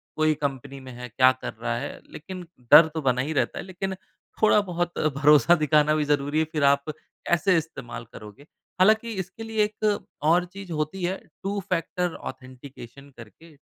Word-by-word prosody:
कोई 155 Hz, 0 st, +2 dB
कंपनी 140 Hz, -2 st, -5 dB
में 130 Hz, -1 st, -11 dB
है 125 Hz, +1 st, -8 dB
क्या 130 Hz, +3 st, +5 dB
कर -, -, -5 dB
रहा 115 Hz, +1 st, -3 dB
है 135 Hz, +4 st, -6 dB
लेकिन 180 Hz, +3 st, -8 dB, 0.3 s
डर 160 Hz, -, +10 dB
तो 160 Hz, -, -3 dB
बना 130 Hz, -2 st, +1 dB
ही 150 Hz, +4 st, -3 dB
रहता 130 Hz, -5 st, -1 dB
है। -, -, -5 dB
लेकिन 190 Hz, +1 st, -4 dB, 0.5 s
थोड़ा 215 Hz, -1 st, +5 dB
बहुत 175 Hz, -2 st, -3 dB, 0.2 s
भरोसा 150 Hz, +4 st, +5 dB
दिखाना 150 Hz, -1 st, +3 dB
भी 155 Hz, -, +1 dB
ज़रूरी 145 Hz, +1 st, 0 dB
है 160 Hz, -, +2 dB
फ़िर 150 Hz, -2 st, -1 dB
आप 140 Hz, 0 st, +4 dB, 0.5 s
ऐसे 180 Hz, +2 st, +3 dB
इस्तेमाल 150 Hz, -7 st, -6 dB
करोगे। 105 Hz, +6 st, -12 dB, 0.4 s
हालाँकि 220 Hz, +4 st, +4 dB
इसके 190 Hz, +5 st, -10 dB
लिए 220 Hz, -1 st, 0 dB
एक 210 Hz, 0 st, 0 dB, 0.2 s
और 170 Hz, +3 st, +3 dB
चीज़ 190 Hz, 0 st, -11 dB
होती 155 Hz, +4 st, -3 dB
है 185 Hz, +2 st, -1 dB, 0.3 s
टू-फ़ैक्टर 180 Hz, -3 st, -2 dB, 0.2 s
ऑथेंटिकेशन 130 Hz, +1 st, -12 dB
करके। 155 Hz, +9 st, -14 dB
155 Hz, 170 wpm, -25 LUFS, 140-180 Hz, 0.5 s, डर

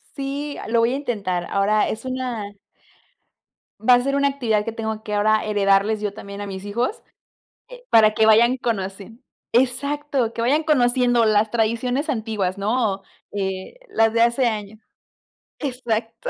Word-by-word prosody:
Sí, 285 Hz, +1 st, -4 dB
ah, -, -, -8 dB
lo 230 Hz, +1 st, +2 dB
voy 230 Hz, +2 st, +2 dB
a -, -, 0 dB
intentar, 200 Hz, -10 st, -2 dB
ahora 205 Hz, +2 st, +2 dB
es 220 Hz, -, -5 dB
una 250 Hz, -5 st, -4 dB, 1.3 s
Va 245 Hz, +4 st, +5 dB
a 245 Hz, -, +2 dB
ser 275 Hz, +2 st, -1 dB
una 280 Hz, 0 st, +3 dB
actividad 230 Hz, -7 st, 0 dB
que 230 Hz, -, -3 dB
tengo 220 Hz, -1 st, -4 dB
que 210 Hz, -, -5 dB
ahora 215 Hz, +1 st, +2 dB
heredarles 205 Hz, 0 st, +2 dB
yo 205 Hz, -1 st, -2 dB
también 200 Hz, -1 st, -9 dB
a 205 Hz, -, -5 dB
mis 190 Hz, 0 st, -7 dB
hijos, 235 Hz, -, -2 dB, 0.7 s
eh, -, -, -13 dB
para 215 Hz, -1 st, +6 dB
que 220 Hz, -, +3 dB
vayan 235 Hz, +4 st, +5 dB
conociendo 210 Hz, 0 st, -4 dB, 0.3 s
Exacto, 265 Hz, 0 st, 0 dB
que 230 Hz, -, -5 dB
vayan 285 Hz, +7 st, +2 dB
conociendo 245 Hz, -5 st, +3 dB
las 215 Hz, 0 st, +3 dB
tradiciones 235 Hz, +5 st, 0 dB
antiguas, 215 Hz, -7 st, -2 dB
¿no?, 210 Hz, -1 st, 0 dB, 0.3 s
eh, 190 Hz, -, -4 dB
las 225 Hz, 0 st, +2 dB
de 230 Hz, -, +2 dB
hace 235 Hz, +2 st, +3 dB
años 215 Hz, -1 st, -4 dB, 0.8 s
Exacto. 245 Hz, -, -3 dB
225 Hz, 160 wpm, -22 LUFS, 210-255 Hz, 1.3 s, para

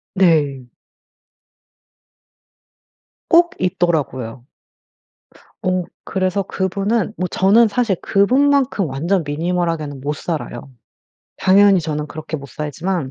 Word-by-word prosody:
네. 150 Hz, -8 st, +2 dB, 2.7 s
꼭 340 Hz, +1 st, +5 dB
있더라고요. 145 Hz, -9 st, -1 dB, 1.2 s
어 185 Hz, 0 st, 0 dB, 0.2 s
그래서 190 Hz, +1 st, -1 dB
그분은 200 Hz, +4 st, -1 dB
뭐 180 Hz, -, -1 dB
저는 205 Hz, +6 st, +4 dB
사실 215 Hz, -2 st, 0 dB
그분만큼 260 Hz, +1 st, +2 dB
완전 165 Hz, +7 st, 0 dB
minimal 170 Hz, +4 st, -1 dB
하게는 150 Hz, -4 st, -4 dB
못 145 Hz, +2 st, -2 dB
살아요. 145 Hz, -5 st, -5 dB, 0.7 s
당연히 195 Hz, 0 st, +5 dB
저는 150 Hz, -1 st, -3 dB
그렇게 155 Hz, +1 st, -6 dB
못 140 Hz, -1 st, -10 dB
살지만 155 Hz, +3 st, -3 dB
180 Hz, 235 characters per minute, -19 LUFS, 150-195 Hz, 2.7 s, 꼭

